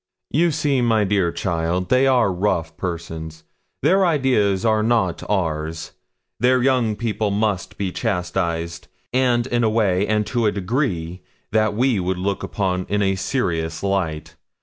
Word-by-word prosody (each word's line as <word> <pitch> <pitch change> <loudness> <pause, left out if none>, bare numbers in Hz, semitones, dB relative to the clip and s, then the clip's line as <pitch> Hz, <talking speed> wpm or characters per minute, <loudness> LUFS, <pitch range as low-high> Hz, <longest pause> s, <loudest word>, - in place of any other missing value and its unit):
'You 170 +5 +3
see, 145 -4 +1
my 115 -3 +3
dear 95 -3 +1
child, 85 +1 -1
they 130 +1 +4
are 120 -7 +3
rough 85 -4 -1
persons; 80 -2 -6 0.4
their 190 +6 +4
ideas 125 - +2
are 110 -1 +3
not 110 -6 +1
ours; 80 -5 -2 0.5
their 125 +2 +3
young 125 -5 +2
people 110 -1 -1
must 100 -2 -1
be 95 -2 -2
chastised, 85 -5 -2 0.3
and 125 -2 +2
in 120 -1 0
a 110 - +3
way 100 -3 +1
and 105 0 +1
to 120 -1 0
a - - +3
degree 95 - -2 0.3
that 110 -1 +2
we 120 -2 +2
would 90 0 -1
look 100 +2 -2
upon 90 -2 -2
in 105 0 +1
a 95 0 +2
serious 90 -7 -2
light. 90 -6 -2
100 Hz, 150 wpm, -21 LUFS, 90-120 Hz, 0.5 s, they